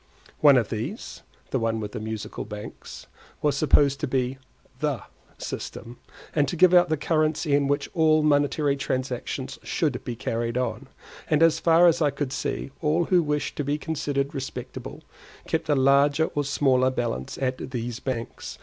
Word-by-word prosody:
One - - +7
of - - +1
these - - -5 0.3
(the - - +1
one 115 -1 0
with 105 -1 -5
the 120 - -5
Musical 110 0 -5
Banks) 105 0 -9 0.4
was 150 -1 +2
supposed 140 -2 +3
to - - -2
be 130 0 -1 0.4
the - - -1 0.3
system, 120 +1 -7 0.3
and 145 -2 +2
to 160 - -3
give 180 +1 +5
out 175 -1 +6
the 155 - +1
currency 155 0 +1
in 140 -1 +3
which 145 +1 0
all 155 -2 +4
monetary 145 -1 +2
transactions 130 0 -3
should 145 -7 -1
be 120 - -4
carried 115 +1 -2
on; 125 +1 -2 0.4
and 155 +1 +4
as 165 -1 +4
far 165 +1 +5
as 170 -1 +4
I 150 - +4
could 140 -1 -3
see, 135 - -3
all 160 +2 +2
who 180 +1 +3
wished 150 -2 -2
to 145 - -1
be 145 +2 -1
considered 145 -2 -2
respectable, 135 -2 -7 0.4
kept - - -2
a 145 - +4
larger 140 +3 +3
or 145 -1 -1
smaller 130 -2 +3
balance 120 - -3
at 130 -1 -2
these 120 -1 -4
banks. 130 -3 -5
140 Hz, 170 wpm, -25 LUFS, 125-155 Hz, 0.4 s, One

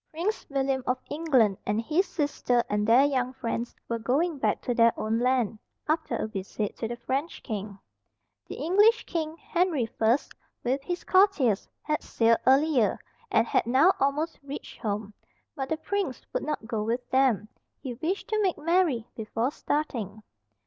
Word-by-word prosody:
Prince 355 +8 -3
William 270 -2 0
of 255 - +2
England 265 - +2
and 210 +1 0
his 315 +11 +1
sister 280 -5 0
and 210 0 +1
their 240 +4 +6
young 255 -3 0
friends 235 -2 -3
were 230 0 -2
going 285 +7 0
back - - +1
to 245 - 0
their 230 -1 +5
own 220 +1 0
land, 245 -4 +1 0.3
after 315 +1 0
a - - -1
visit 205 0 -4
to 225 - -2
the 240 - -4
French 270 +7 -3
king. 205 -3 -5 0.7
The - - -6
English 415 +7 +4
king, 320 -2 -3
Henry 340 -9 0
I, 225 +3 +5 0.5
with 260 +3 0
his 350 +5 -4
courtiers, 370 - +3
had 305 0 -1
sailed 230 0 +2
earlier, 270 -3 +4 0.3
and 380 - +3
had 230 - +1
now 275 +10 +5
almost 295 +4 0
reached 280 0 -8
home. 210 -1 -3 0.4
But 270 -3 -4
the 320 - 0
prince 405 +5 -3
would - - 0
not 305 -7 -3
go 225 -2 -2
with 235 +4 -2
them, 260 -6 +3 0.3
he 255 - -5
wished 325 +11 -3
to 430 -1 +1
make 380 -4 +1
merry 315 -8 +1
before 225 +3 -2
starting. 230 -10 -3
265 Hz, 165 wpm, -27 LUFS, 230-315 Hz, 0.7 s, their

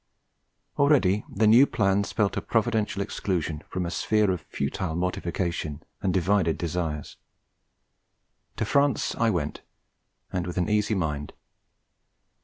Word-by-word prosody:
Already 125 -9 +4
the 110 +3 +1
new 120 +6 +7
plan 100 -1 +2
spelt 100 0 0
a - - -1
providential 105 -3 0
exclusion 85 -7 -2
from 90 -1 -2
a 85 - -3
sphere 105 +7 +2
of 90 -3 -2
futile 80 +4 -3
mortification 85 -3 -2 0.2
and 95 - +1
divided 95 -2 +2
desires: 80 -3 -3 1.4
to 110 - -1
France 140 +3 +2
I 115 - +1
went, 85 -8 -2 0.7
and 90 -1 -1
with 90 - -5
an 90 - +1
easy 105 0 +2
mind. 75 -5 -2
95 Hz, 125 wpm, -26 LUFS, 85-105 Hz, 1.4 s, new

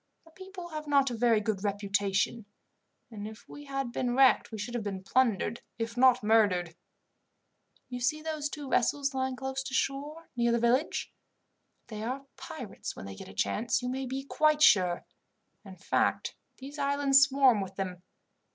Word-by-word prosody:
The 325 - -19
people 375 0 -10
have 305 -2 -6
not 280 -2 +3
a - - -3
very 230 -1 +3
good 210 -2 -2
reputation, 200 +1 -1 0.6
and 210 -1 -6
if 220 0 -12
we 290 - -11
had 275 -3 -3
been 245 0 -1
wrecked 265 -2 +4
we 220 - -5
should 215 +4 -5
have 240 -3 -2
been 195 -2 -5
plundered, 235 0 +1 0.2
if 230 0 -4
not 255 -1 +5
murdered. 200 -6 +3 1.1
"You 250 -1 -6
see 305 +5 0
those 310 -2 -3
two 290 -1 -7
vessels 275 +2 +1
lying 260 0 -1
close 265 +1 -4
to 265 0 -7
the - - 0
shore, 290 +5 -2
near 235 0 +2
the 235 - +3
village? 240 +6 0 0.7
They 215 -2 -7
are 260 +5 -4
pirates 265 - -7
when - - -9
they 95 - -7
get 95 - -10
a - - -11
chance, 235 - 0
you 250 - -2
may 265 +1 -3
be 265 +2 -4
quite 305 +2 +2
sure. 180 -4 +4 0.6
In 195 -3 -11
fact, - - 0 0.2
these 280 +3 -9
islands 280 -1 +4
swarm 270 -5 +4
with 190 0 -6
them. 185 -2 -4
250 Hz, 180 wpm, -29 LUFS, 210-275 Hz, 1.1 s, not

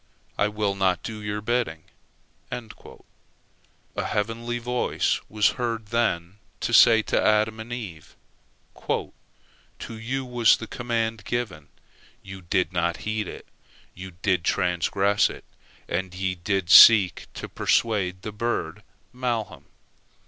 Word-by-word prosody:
I 105 - +2
will 105 -1 -1
not 95 -2 0
do 110 -2 -6
your 105 0 -4
bidding." 105 -8 -1 0.7
A 120 -3 -11
heavenly 115 +3 -2
voice 125 +1 -1
was 105 0 +3
heard 115 -3 -3
then 105 -5 -1 0.2
to 120 - -2
say 110 0 +7
to - - 0
Adam 110 +1 +2
and 110 +2 -8
Eve: 95 -11 -8 0.7
"To - - 0 0.8
you 120 +4 -4
was 120 -3 +4
the 115 - -7
command 115 -2 -3
given. 100 -12 -4 0.6
Ye 95 0 -9
did 85 - -1
not 85 0 0
heed 110 -2 -2
it; - - -9 0.5
ye 95 0 -10
did 95 -4 +1
transgress 95 +4 +1
it, - - -10 0.4
and 90 +1 -3
ye 95 0 -1
did 90 0 -2
seek 100 -5 +8
to - - -6
persuade 95 -5 0
the 110 - -5
bird 105 -4 -3 0.3
malham. 120 -4 -3
105 Hz, 125 wpm, -25 LUFS, 95-115 Hz, 0.8 s, seek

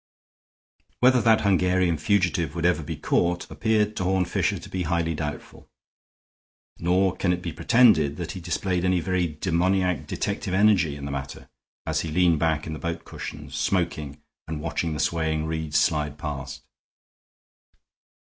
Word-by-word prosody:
Whether 125 0 +5
that 110 0 +4
Hungarian 90 -3 +2
fugitive 85 -3 +1
would 85 0 -2
ever 90 -1 +2
be 75 - -5
caught 85 0 0
appeared 110 -1 +1
to - - -1
Horne 95 0 +1
Fisher 85 - 0
to - - -10
be 95 - -4
highly 85 -1 0
doubtful; 75 -1 -6 1.1
nor 90 +2 +2
can 90 0 0
it 90 0 -2
be 85 - -4
pretended 85 - +4
that 85 -2 -4
he 95 - -7
displayed 90 +1 -1
any 90 -1 +2
very 90 +1 0
demoniac 90 +2 0
detective 95 - -2
energy 95 -7 +3
in 70 -1 -7
the 70 - -4
matter 70 -1 -6 0.4
as - - 0
he 80 - -4
leaned 85 -1 +3
back 80 -1 0
in 80 - -5
the 75 - -6
boat 85 0 -4
cushions, 75 -3 -8
smoking, 75 -3 -1 0.3
and 80 -1 -4
watching 80 +1 -2
the 75 - -4
swaying 80 0 0
reeds 80 -2 -2
slide 75 -2 +1
past. 75 -1 -6
85 Hz, 160 wpm, -25 LUFS, 75-90 Hz, 1.1 s, Whether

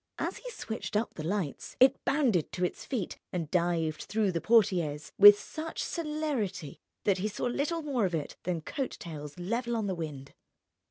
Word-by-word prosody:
As - - -2
he - - -8
switched 225 - -5
up 215 +2 0
the 155 - -6
lights 175 -4 -3
it 260 +1 +5
bounded 245 - +2
to 180 0 0
its - - -5
feet 225 -9 -3
and 165 -4 -3
dived 170 -3 +1
through 210 -2 +1
the 165 -2 -2
portières 180 -10 +2
with 205 0 +11
such 320 +6 -5
celerity 295 - -3 0.2
that 195 -2 +2
he 205 - 0
saw 210 - -3
little 295 +7 -1
more 265 -8 +1
of 175 - -2
it 150 -3 -4
than 175 -2 -2
coat 270 - -4
tails 150 -3 -8
level 235 +6 -1
on 220 -2 -1
the 195 - -1
wind. 150 -5 -6
200 Hz, 180 wpm, -30 LUFS, 165-245 Hz, 0.2 s, with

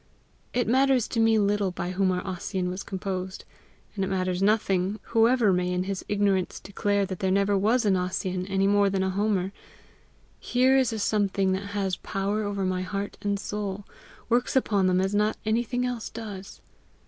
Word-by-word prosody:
It 245 0 0
matters 260 0 +3
to 230 - -1
me 225 0 +4
little 205 -1 +2
by 180 0 -4
whom 185 0 +1
our 180 0 -2
Ossian 185 -1 -3
was 185 +2 -5
composed, 190 -1 -5 0.5
and 195 - -2
it - - -1
matters 185 -1 -1
nothing 200 -1 +1
whoever 230 -2 +4
may 180 0 0
in 180 0 0
his 195 0 -4
ignorance 200 -3 +1
declare 200 0 0
that 185 -2 -6
there 190 - 0
never 200 +1 +2
was 220 +5 +2
an 200 -2 +4
Ossian 185 0 -2
any 195 0 +1
more 200 0 +4
than 190 -1 0
a 190 - 0
Homer: 195 -1 0 0.9
here 255 +2 +3
is 260 -3 +3
a 220 - -3
something 200 -2 +1
that 200 +2 -3
has 190 -2 -1
power 200 +2 -2
over 200 -2 -2
my 185 0 -1
heart 200 +2 -4
and 200 -1 -1
soul, 205 -1 -4 0.4
works 245 +3 +1
upon 205 -7 +2
them 185 0 +3
as 190 +2 0
not 210 +1 +1
anything 240 +3 0
else 245 -3 -3
does. 205 -4 -8
200 Hz, 185 wpm, -26 LUFS, 190-215 Hz, 0.9 s, me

